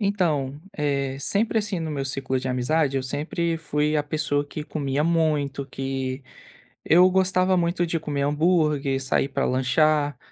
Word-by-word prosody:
Então, 155 -9 0 0.2
eh, 140 -2 -1
sempre 215 +10 +1
assim 205 -3 -2
no 160 -1 -3
meu 140 -2 -3
ciclo 130 -1 -2
de 130 - -4
amizade, 135 +3 +1
eu 135 - 0
sempre 155 +5 -2
fui 150 -1 0
a 150 - +1
pessoa 145 -1 -1
que 150 +1 -6
comia 145 -2 -2
muito 150 -4 0
que 135 0 -4 0.6
eu 180 +3 +6
gostava 185 0 +2
muito 175 0 +1
de 165 0 -2
comer 145 -2 -3
hambúrguer, 150 -3 +1
sair 135 +1 +1
para 135 0 -2
lanchar 145 +2 +2
150 Hz, 155 wpm, -24 LUFS, 135-165 Hz, 0.6 s, eu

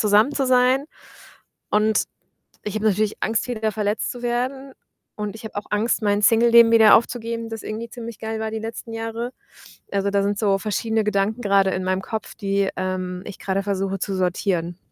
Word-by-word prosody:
zusammen 215 +6 +4
zu 270 -2 0
sein 255 +2 +4 0.9
und 215 0 +2 0.6
ich 210 - -4
habe 215 0 -1
natürlich 215 +1 +1
Angst, 225 +2 0
wieder 220 -3 -1
verletzt 210 0 -1
zu 245 - -10
werden 255 +3 -2 0.4
und 210 -1 -4
ich 225 - -13
habe 220 - -8
auch 205 - -4
Angst, 220 +3 +1
mein 205 0 +1
Singleleben 230 +1 +6
wieder 220 -2 +8
aufzugeben, 230 0 -2
das 225 -1 -6
irgendwie 225 +2 -5
ziemlich 230 -2 -8
geil 220 0 -4
war 220 0 -2
die 220 - -3
letzten 225 +1 -7
Jahre. 225 +2 -4 0.6
Also, 200 0 0
da 200 0 +2
sind 200 0 -1
so 200 -3 +2
verschiedene 220 +2 -1
Gedanken 210 +2 0
grade 200 -3 +3
in 185 0 -2
meinem 185 0 0
Kopf, 220 +3 -5
die, 200 -2 0
ähm, 185 -1 -3
ich 205 - -8
grade 195 0 -1
versuche 195 -1 -2
zu 195 +1 -2
sortieren. 180 -2 -1
215 Hz, 185 wpm, -22 LUFS, 200-230 Hz, 0.9 s, wieder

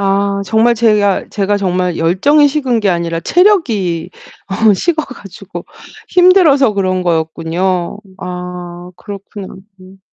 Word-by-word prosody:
아 200 0 0
정말 225 +4 +2
제가 210 -4 +2
제가 205 0 -1
정말 180 -2 -1
열정이 240 - +3
식은 270 -5 0
게 205 - +1
아니라 170 -2 -1
체력이 225 - +1 0.4
어 210 +2 +2
식어 315 - 0
가지고 200 -5 -10 0.4
힘들어서 355 - +4
그런 185 -2 -1
거였군요. 170 +2 -1 0.2
아 180 0 -7
그렇구나 200 -1 -9 0.3
음. 185 +1 -16
195 Hz, 255 characters per minute, -14 LUFS, 180-230 Hz, 0.4 s, 힘들어서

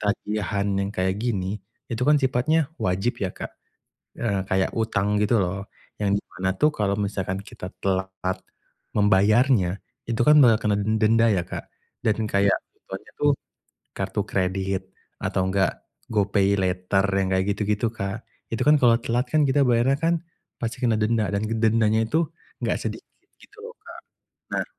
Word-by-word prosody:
tagihan 105 -1 -1
yang 100 0 -1
kayak 95 0 0
gini, 100 -3 -2 0.3
itu 115 +1 -2
kan 150 0 +6
sifatnya 135 +4 +1
wajib 95 +6 0
ya, 95 - +1
Kak, - - -7 0.7
eee, 100 -5 0
kayak 95 0 +1
utang 105 -2 +1
gitu 105 +2 +3
loh 100 +2 -2 0.4
yang 100 -1 +2
di - - -4 0.2
mana 95 0 0
tuh 150 +9 +4
kalau 100 -6 0
misalkan 95 -2 -2
kita 90 -2 -8
telat 95 -1 0
part 95 0 -1 0.6
membayarnya 105 0 +3 0.3
itu 115 0 -1
kan 150 0 +8
bakal 115 -3 +6
kena 100 - +2
denda 110 +2 +3
ya, 90 - +1
Kak. - - -6 0.4
Dan 110 0 +1
kayak 100 -1 +3 0.2
ituannya - - -10
tuh 145 0 +4 0.6
kartu - - -2
kredit 95 0 -1 0.3
atau 95 - 0
enggak 95 0 0 0.3
GoPay 100 -2 +2
Later 95 +1 +1
yang 95 -1 +1
kayak 95 0 +1
gitu-gitu, 105 +2 0
Kak. 100 +1 -4 0.3
Itu 115 - -1
kan 150 - +7
kalau 120 -2 +6
telat 120 +2 -1
kan 155 -1 +4
kita 140 +1 +3
bayarnya 120 +3 +3
kan 165 +2 +2 0.5
pasti 125 +3 -4
kena 115 -2 +3
denda 110 -1 +1
dan 100 +1 0
dendanya 110 0 +2
itu 160 +6 +1 0.4
enggak - - +1
sedikit - - -7 0.2
gitu 415 - -19
loh, 470 0 -8
Kak. - - -11 0.6
Nah, - - 0
105 Hz, 160 wpm, -24 LUFS, 95-115 Hz, 0.7 s, kan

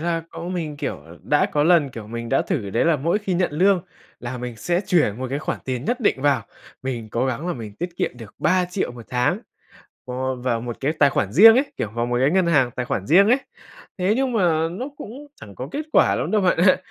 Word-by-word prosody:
là 165 0 -1
cũng 175 +2 -6
mình, 160 -5 -4
kiểu, - - -4 0.2
đã 150 0 +2
có 145 - +2
lần, 165 -4 +4
kiểu, 115 -3 -9
mình 115 +1 -6
đã 135 - +2
thử 120 - -3
đấy 115 - +1
là 170 -2 +3
mỗi 165 +8 0
khi 200 -3 -2
nhận 175 -3 0
lương 185 +4 +3 0.4
là 125 +1 -5
mình 120 -1 -6
sẽ 175 +10 0
chuyển 150 - +2
một 130 - -3
cái 140 - -1
khoản 155 - -3
tiền 130 -1 -3
nhất 245 +7 -1
định 170 - +1
vào, 140 -5 +2 0.4
mình 120 -4 -4
cố 120 +4 0
gắng 130 +6 -3
là 180 - -1
mình 110 -4 -8
tiết 175 - -4
kiệm - - 0
được 115 -4 -11
3.000.000 180 0 0
1 120 -2 -11
tháng 125 0 +1 0.7
vô 130 +1 -3
vào 120 -2 -1
một 120 0 -5
cái 140 +3 0
tài 145 -3 +3
khoản 105 -5 -1
riêng 220 - +9
ấy, 270 +3 +1
kiểu, 105 - -3
vào 120 +2 -2
một 120 0 -1
cái 135 +2 +3
ngân 185 +1 +2
hàng 145 -7 +3
tài 125 +1 -4
khoản 100 -5 -3
riêng 195 +7 +5
ấy. 250 +4 +4 0.6
Thế 185 +3 +2
nhưng 265 -1 0
mà 165 -7 +2
nó 200 +10 -5
cũng 270 +6 -9
chẳng 100 - -11
có 130 +6 -6
kết 295 - -2
quả - - +4
lắm - - -2
đâu 215 - +2
bạn 185 -3 +2
ạ, 185 +2 +5
145 Hz, 250 wpm, -22 LUFS, 125-180 Hz, 0.7 s, riêng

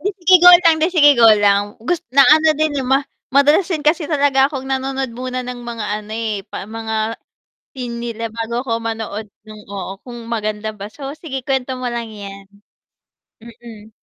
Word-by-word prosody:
'Di 400 +6 -1
sige, 370 0 +3
go 355 - +10 0.2
lang. 325 - +5
'Di 325 - +3
sige, 290 -3 +7
go 230 - +7 0.2
lang. 200 0 +4 0.2
Gus 350 +1 0 0.2
na 275 - +9
ano 315 0 +3
din, 310 0 +1
eh, - - -4
ma 270 - +5 0.4
madalas 295 +6 +4
din 325 -5 -2
kasi 310 +1 +1
talaga 280 -3 +2
akong 270 -2 -6
nanonood 265 -1 -2
muna 255 +1 -4
ng 250 0 -6
mga 235 -2 -6 0.2
ano, 215 0 -14
eh, 220 -2 -2
pa - - -6
mga 225 0 -5 0.8
theme 240 -2 -5
nila 230 -1 -5
bago 230 +2 -4
ako 245 - -3
manood 220 -1 -5 0.2
nung 215 0 -12
oo, 195 -1 -6
kung 245 -2 -10
maganda 215 -1 -3
ba. 205 -1 -9
So, 275 +4 -8
sige 270 -5 -7
kuwento 265 -1 -2
mo 255 - -7
lang 235 -1 -4
'yan. 200 -2 -10 1.0
Mm. 225 -2 -13
240 Hz, 190 wpm, -18 LUFS, 220-280 Hz, 1.0 s, go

